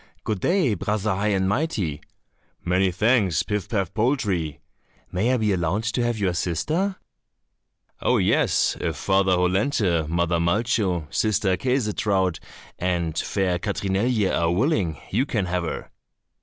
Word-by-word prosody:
"Good 105 -3 -2
day, 175 - +2
Brother 105 +2 -1
High 100 +3 -1
and 95 -2 +1
Mighty." 100 - -1 0.6
"Many 90 +2 +2
thanks, 105 - +2
Pif 105 -3 -3
paf 100 -7 -1
poltrie." 105 - 0 0.5
"May 105 +7 +1
I 130 - +2
be 105 -3 +1
allowed 90 +4 0
to 125 - 0
have 120 -1 0
your 95 -4 0
sister?" 155 - -1 1.1
"Oh, - - +2
yes, - - +2
if 80 -3 -1
Father 95 +4 +2
Hollenthe, 90 - +1
Mother 85 0 +1
Malcho, 95 -1 +1
Sister 105 -3 +1
Käsetraut, 105 -5 0 0.4
and 85 -3 -1
fair 90 0 0
Katrinelje 100 +2 0
are 85 0 +1
willing, 95 - 0
you 125 +8 +1
can 105 -8 -1
have 90 -1 -1
her." - - -5
95 Hz, 135 wpm, -24 LUFS, 90-110 Hz, 1.1 s, day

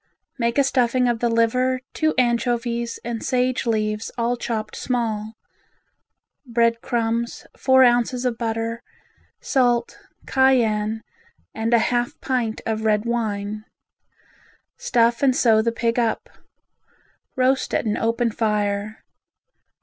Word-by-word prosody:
Make 235 +1 0
a 280 - +5
stuffing 255 -2 +2
of 240 -1 0
the 240 - +1
liver, 250 +3 +1
two 315 -1 0
anchovies, 235 -1 0
and 235 -1 -4
sage 255 0 0
leaves 215 -1 -1
all 240 +1 0
chopped 220 -3 -4
small; 220 -3 -2 1.1
bread 230 -2 +1
crumbs, 235 -1 -2
four 260 -1 +4
ounces 245 +1 +2
of 245 -2 0
butter, 230 0 -3 0.6
salt, 245 -3 +1 0.3
cayenne 225 -5 +2 0.5
and 225 +1 -2
a 235 - +6 0.2
half 240 0 -1
pint 245 -4 -2
of 220 -1 -2
red 215 0 +1
wine. 215 -3 -2 1.1
Stuff 240 - +1
and 265 -2 +3
sew 225 -4 +4
the 230 +1 0
pig 230 +1 -1
up. 230 -2 -1 1.1
Roast 260 +1 +1
at - - 0
an 215 -1 0
open 230 +1 0
fire. 210 -1 -1
235 Hz, 120 wpm, -22 LUFS, 225-245 Hz, 1.1 s, a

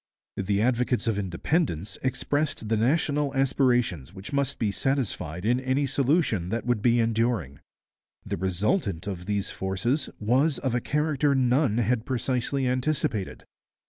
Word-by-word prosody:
The 100 +1 +1
advocates 125 0 +1
of 110 -3 0
Independence 100 - -1
expressed 135 -2 -1
the 110 - +3
national 145 +4 +1
aspirations 125 - +1
which 95 +9 -8
must 140 -1 0
be 105 -3 0
satisfied 100 - -2
in 120 +3 +3
any 130 +2 0
solution 135 - +1
that 115 +2 -2
would 120 -4 +1
be 120 +1 +3
enduring. 115 - 0 0.7
The - - -2
resultant 95 - 0
of 90 -3 -5
these 100 -2 -1
forces 105 +9 -1
was 130 +8 +2
of 130 -3 -2
a 125 - +1
character 150 -1 +1
none 125 -2 +2
had 120 0 0
precisely 130 +1 -1
anticipated. 125 -6 -1
120 Hz, 140 wpm, -26 LUFS, 105-135 Hz, 0.7 s, the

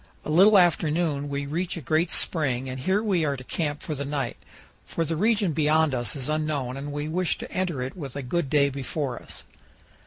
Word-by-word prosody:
A - - -3
little 195 +6 +7
after 175 -3 +4
noon 150 -3 -1
we 140 0 -2
reach 170 +5 -2
a - - -3
great 155 +5 +1
spring, 135 -6 +1
and 130 0 -5
here 190 +10 +1
we 190 -6 +1
are 140 -2 0
to 130 - -9
camp 145 +1 -3
for 155 - -3
the 140 -1 -3
night, 140 -4 -2 0.5
for 165 - -2
the 165 - -2
region 205 0 +2
beyond 155 0 +3
us 120 -4 -1
is 130 -3 -3
unknown 150 -4 -1
and 140 +2 -5
we 145 +1 -3
wish 175 +2 +1
to - - -8
enter 175 -8 -1
it 130 - -5
with 140 -8 -7
a 140 - -4
good 145 +3 -1
day 140 -1 +3
before 135 -1 -3
us. - - -8
150 Hz, 220 wpm, -26 LUFS, 140-170 Hz, 0.5 s, little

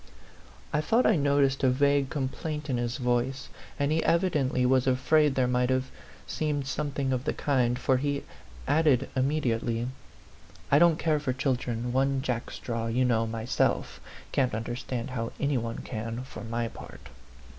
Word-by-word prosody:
I 150 - +2
thought 230 +9 +2
I 220 - +5
noticed 140 -2 +2
a 130 - +5
vague 140 +1 +2
complaint 150 +2 -3
in 125 - +1
his 120 +2 -2
voice; 125 +1 -1 0.3
and 145 +1 0
he 160 +1 +1
evidently 150 -8 +2
was 130 0 +3
afraid 140 +3 +3
there 130 - +3
might 125 0 +1
have 130 0 0 0.3
seemed 150 -3 -2
something 140 -1 -2
of 125 0 -2
the - - -1
kind, 125 -4 +1
for 130 +1 +2
he 145 +1 -1 0.4
added, 145 -5 +3
immediately 120 -4 0 0.8
"I 140 - +6
don't 170 -1 +5
care 155 -3 +1
for 140 -3 -1
children 125 -2 -1
one 135 0 +1
jackstraw, 115 -2 -3
you 125 +3 +1
know, 115 -2 +2
myself; 110 +1 -1 0.3
can't 130 -5 +1
understand 120 +2 -4
how 115 -2 -3
any 140 -2 +1
one 115 0 -5
can, 115 +1 -5
for 130 -4 -9
my 115 +1 -2
part." - - -11
130 Hz, 155 wpm, -28 LUFS, 120-145 Hz, 0.8 s, I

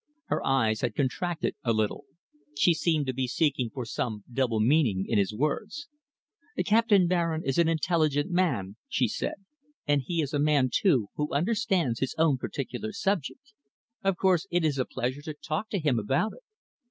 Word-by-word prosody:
Her - - 0
eyes 110 -5 +1
had 120 -3 -1
contracted 160 +5 -1
a 115 - +2
little. 110 -1 -1 0.5
She 170 +4 +5
seemed 160 -2 +1
to 130 - -2
be 130 0 -1
seeking 135 -3 0
for 125 +2 -6
some 110 -2 -3
double 120 -4 +1
meaning 115 -6 +3
in 110 - +2
his 100 0 +1
words. 200 - -3 0.8
"Captain 215 -3 +4
Baring 170 -2 0
is 135 +4 0
an 170 - +4
intelligent 160 -1 +1
man," 125 - 0
she 125 - +1
said, - - -3 0.5
"and 145 -1 +3
he 170 +6 -3
is 140 - -5
a 145 - +1
man, 145 -4 +3
too, 130 - +2
who 150 0 -1
understands 185 - +1
his 135 - -2
own 155 -5 +3
particular 150 +12 -4
subject. 200 - -3 0.5
Of 195 -2 +1
course 185 -1 +2
it 175 -2 +1
is 145 -3 0
a 130 - +1
pleasure 130 +2 -3
to 155 0 -6
talk 160 +8 -4
to 200 - -1
him 145 -9 +1
about 135 - 0
it." - - -15
150 Hz, 175 wpm, -28 LUFS, 125-175 Hz, 0.8 s, She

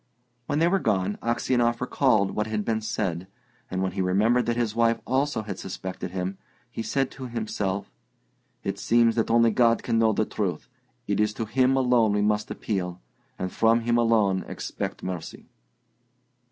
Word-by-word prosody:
When 145 - 0
they 165 +2 +4
were 195 +2 +2
gone, 100 - 0
Aksionov 120 0 +1
recalled 125 -6 +2
what 105 0 -2
had 105 -1 -2
been 110 -1 0
said, 95 -6 -2 0.4
and 95 0 -2
when 95 - -1
he - - -2
remembered 110 +7 +2
that 120 - +1
his 115 -3 0
wife 115 0 +2
also 135 -2 0
had 100 -3 -6
suspected 95 -1 -6
him, 95 +1 -4 0.3
he - - -4
said 135 +3 -1
to 130 -1 -7
himself, 105 -4 -3 0.7
"It 100 0 -3
seems 115 0 +3
that 115 -1 0
only 115 0 +4
God 115 +1 +3
can 115 - +1
know 110 -1 +4
the - - +1
truth; - - -3 0.4
it - - -1
is 105 0 +1
to 115 - -3
Him 130 +4 +2
alone 125 -5 +3
we 105 0 +1
must 105 0 +1
appeal, 90 -4 -3 0.4
and 95 0 -4
from 115 +1 +3
Him 120 +1 +2
alone 105 -5 +2
expect - - -5
mercy." 90 -3 -6
110 Hz, 175 wpm, -26 LUFS, 100-120 Hz, 0.7 s, they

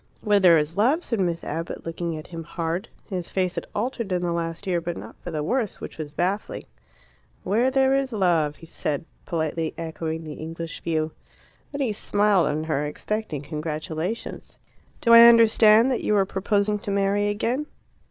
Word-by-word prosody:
"Where 210 -2 +4
there 175 -4 +7
is 155 +3 -1
love," 270 +11 +3
said 230 - -1
Miss 170 -3 0
Abbott, 165 +3 -5
looking 165 0 -3
at 155 - -8
him 165 -2 -7
hard. 170 +5 -3 0.2
His 180 -5 -4
face 185 -2 0
had - - -5
altered 230 -1 -2
in 180 -1 0
the 175 - 0
last 165 +1 -3
year, 175 -3 0
but 170 0 -4
not - - -9
for - - -6
the 155 -3 -3
worse, 230 - -1
which - - -9
was 150 -2 -5
baffling. 185 +7 -2 0.8
"Where 225 +7 +2
there 265 0 +3
is 270 -1 0
love," 170 -8 +1
said 150 -3 -3
he, - - -21 0.2
politely 160 -1 -2
echoing 160 0 -4
the 155 -1 -7
English 165 +1 -7
view. 160 -1 -1 0.6
Then 285 0 -4
he 240 -6 0
smiled 205 -2 +2
on 150 +1 -1
her, 155 -2 -1
expecting 150 0 -4
congratulations. 155 +6 -5 0.4
"Do 230 - +5
I 230 0 +11
understand 230 +1 +6
that 250 - 0
you 210 - +2
are 195 - +3
proposing 200 +2 0
to 205 - -7
marry 200 +1 +1
again?" 235 +8 -1
180 Hz, 180 wpm, -24 LUFS, 160-215 Hz, 0.8 s, I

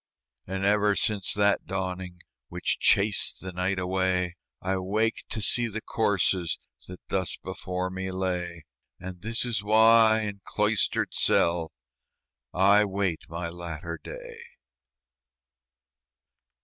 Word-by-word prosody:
And 95 +1 -2
ever 105 0 +3
since 105 -2 +1
that 100 0 +2
dawning 95 -2 -4 0.3
Which - - -2
chased 100 +1 +3
the 95 - -6
night 90 +2 -1
away, 90 -1 0 0.2
I 95 +1 -1
wake 105 +5 0
to 110 - -3
see 120 +4 +1
the 110 0 -4
corses 95 -6 0 0.3
That 90 0 -9
thus 95 -3 -1
before 90 0 -4
me 95 0 -4
lay: 90 -3 -3 0.4
And 90 -1 -8
this 115 +3 -1
is 115 -5 -1
why 110 +1 +6
in 100 -2 -5
cloistered 105 0 0
cell 85 -1 +2 0.8
I 100 +3 +5
wait 95 -4 -2
my 85 +2 -4
latter 85 -1 -6
day. - - -9
95 Hz, 120 wpm, -27 LUFS, 90-105 Hz, 0.8 s, why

